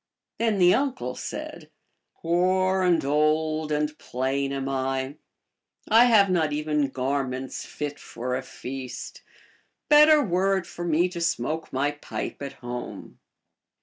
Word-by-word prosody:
Then 225 -3 +1
the 180 -1 +6
uncde 240 - 0
said, - - -7 0.2
" - - -53
Poor 185 +2 +2
and 175 -5 +2
old 155 +1 +1
and 150 0 0
plain 135 +2 -2
am 135 -1 -3
I; 135 +1 -2 0.7
I 230 +2 +7
have 215 -5 +6
not 165 -5 +1
even 150 -1 0
garments 130 0 -3
fit 145 -1 -5
for 125 +2 -4
a - - -2
feast; 130 -1 -7 0.7
better 300 +1 +8
were 195 -1 +2
it 185 - -4
for 175 - -7
me 170 +1 +2
to 175 -1 -6
smoke 160 0 -1
my 140 +2 0
pipe 150 0 -6
at 140 -1 -5
home." 120 -1 -8
150 Hz, 140 wpm, -25 LUFS, 135-180 Hz, 0.7 s, better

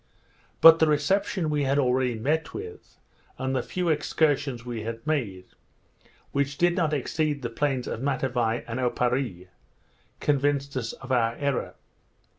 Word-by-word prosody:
But 165 0 +9
the 160 - +4
reception 155 +3 +1
we 150 -1 +1
had 135 +1 +1
already 125 -2 +2
met 150 +8 -1
with, 435 +1 -9 0.4
and 130 0 -2
the 130 - +1
few 180 -2 -2
excursions 145 -5 0
we 120 -2 -4
had 115 +2 -6
made, 110 -12 -2 0.9
which 140 +1 -1
did 175 0 +3
not 165 -4 +1
exceed 150 0 -1
the 120 - -3
plains 135 0 -1
of 115 - -4
Matavai 125 -4 0
and 115 +2 -4
Oparree, 125 -7 -1 0.7
convinced 140 -1 0
us 115 -3 -3
of 135 -1 -10
our 115 -2 +2
error. 140 -3 -2
135 Hz, 145 wpm, -26 LUFS, 120-150 Hz, 0.9 s, But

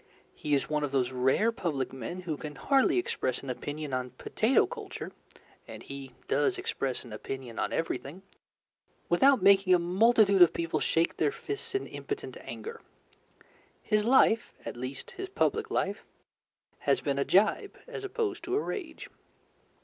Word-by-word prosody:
He 150 -1 0
is 140 - 0
one 150 -1 -1
of 145 - -2
those 130 -2 +1
rare 130 - +2
public 150 - -2
men 135 +8 -5
who 165 -4 -3
can 150 0 -7
hardly 275 +3 +3
express 130 - -1
an 135 - -3
opinion 145 +2 -5
on 130 0 -1
potato 215 - +2
culture 440 -6 -7 0.6
and - - -9
he 135 -2 -8
does 145 +1 +2
express 130 -2 -2
an 120 -4 -10
opinion 125 +1 -6
on - - -1
everything 165 +2 -3 0.9
without 260 +5 +5
making 195 -1 +6
a - - +5
multitude 195 +3 +4
of 175 - +8
people 165 -1 -1
shake 165 +1 +1
their 150 -2 +2
fists 415 -1 -5
in 395 - 0
impotent - - -6
anger. 460 +1 -8 1.0
His 210 -1 +2
life 230 -1 +4
at - - -5
least, 130 +3 -6
his 385 -1 -6
public 445 +3 0
life - - -1 0.9
has - - +4
been 140 -2 -1
a - - +3
jibe 215 - +2
opposed 410 -5 -3
to 365 +2 -1
a - - +3
rage. 345 -7 -5
175 Hz, 155 wpm, -29 LUFS, -, 1.0 s, of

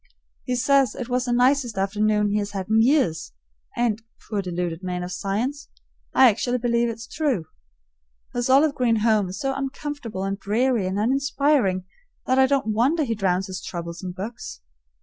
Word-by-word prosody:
He 250 - -1
says 270 -1 +3
it 245 -1 -6
was 250 0 0
the 245 - -1
nicest 245 -2 +2
afternoon 210 +1 +1
he 210 - +1
has 205 0 -4
had 190 -1 -4
in 220 +1 +4
years, 235 - +2 0.4
and, 225 -2 +1 0.3
poor 210 -2 -1
deluded 175 -2 -3
man 180 -1 -3
of 180 - -6
science, 235 +11 -3 0.4
I 260 - +7
actually 245 +3 +1
believe 235 -1 +1
it's 225 0 -6
true. 270 - -1 0.9
His 245 +1 -1
olive 280 +3 +5
green 235 -5 +1
home 215 -4 +3
is 185 - -6
so 270 0 -1
uncomfortable 270 -6 -5
and 195 +1 -2
dreary 225 0 +1
and 190 +1 -2
uninspiring 265 -4 +1 0.4
that 260 +1 +2
I 265 - +6
don't 265 -6 +1
wonder 275 +9 +2
he 230 -5 -1
drowns 190 -3 0
his 185 0 -6
troubles 170 0 -6
in 185 - -4
books. 185 - -7
225 Hz, 175 wpm, -24 LUFS, 195-260 Hz, 0.9 s, I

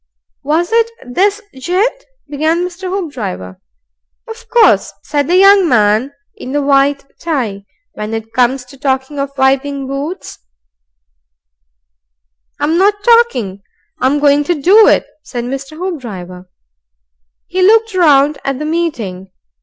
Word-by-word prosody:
"Was 320 +6 -1
it 460 0 +2 0.2
this 390 +11 0
gent?" 370 - -1 0.2
began 315 +4 0
Mr. 365 +1 -6
Hoopdriver. 235 - -5 0.7
"Of 450 0 -11
course," 475 -2 +4
said 285 -2 -1
the 350 - +2
young 390 -2 +6
man 215 +3 +2 0.2
in 260 - -8
the 290 - +1
white 275 0 +2
tie, 235 -12 -3 0.3
"when 215 +1 -5
it 225 0 -7
comes 250 +1 +1
to 275 +2 -16
talking 265 +1 -2
of 275 0 -2
wiping 270 +1 +1
boots 280 +7 -6 1.5
" - - -54
"I'm 320 +4 +1
not 410 +1 +2
talking; 435 - +2 0.4
I'm 265 +3 +2
going 290 0 +3
to 345 0 -1
do 405 +9 +6
it," - - +3 0.2
said 240 -4 -6
Mr. 275 +4 -6
Hoopdriver. 195 - -7 1.0
He 370 +1 -2
looked 445 +3 +4
round 295 -5 +3
at 275 -1 -2
the 300 - -5
meeting. 240 - -3
285 Hz, 130 wpm, -14 LUFS, 245-355 Hz, 1.5 s, young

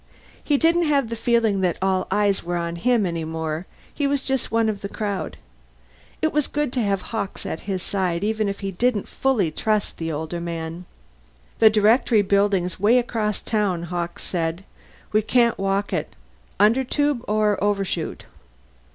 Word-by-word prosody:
He 290 - +2
didn't 335 +3 +3
have 280 -6 +2
the 230 - -3
feeling 225 -3 +2
that 180 -2 +1
all 190 -1 +1
eyes 205 -2 +2
were 175 +1 -2
on 170 0 -2
him, 235 +2 +2
any 170 -2 -2
more; 160 +1 -4 0.3
he 285 - 0
was 280 -1 0
just 265 -2 -1
one 225 0 +2
of 210 -2 -2
the 200 - -5
crowd. 205 -3 -3 0.9
It 315 - +2
was 300 -1 +1
good 295 -4 -2
to 250 - 0
have 200 -3 0
Hawkes 205 -3 -3
at 160 - -3
his 185 -2 -2
side, 185 -3 -1
even 215 -1 0
if 200 - -5
he 195 -1 -3
didn't 220 +2 0
fully 230 -12 +1
trust 215 +5 -1
the 165 0 -2
older 160 +3 -4
man. 170 +1 -5 0.7
"The 220 - +8
Directory 215 +1 +4
Building's 200 -2 +1
way 215 +5 +5
across 220 -4 -1
town," 200 -6 0
Hawkes 175 0 -4
said. 170 0 -2 0.5
"We 215 0 +3
can't 235 +2 +2
walk 195 +1 0
it. - - -3 0.4
Undertube 260 +4 +2
or 210 -1 +1
Overshoot?" 195 -5 -1
205 Hz, 170 wpm, -23 LUFS, 180-230 Hz, 0.9 s, The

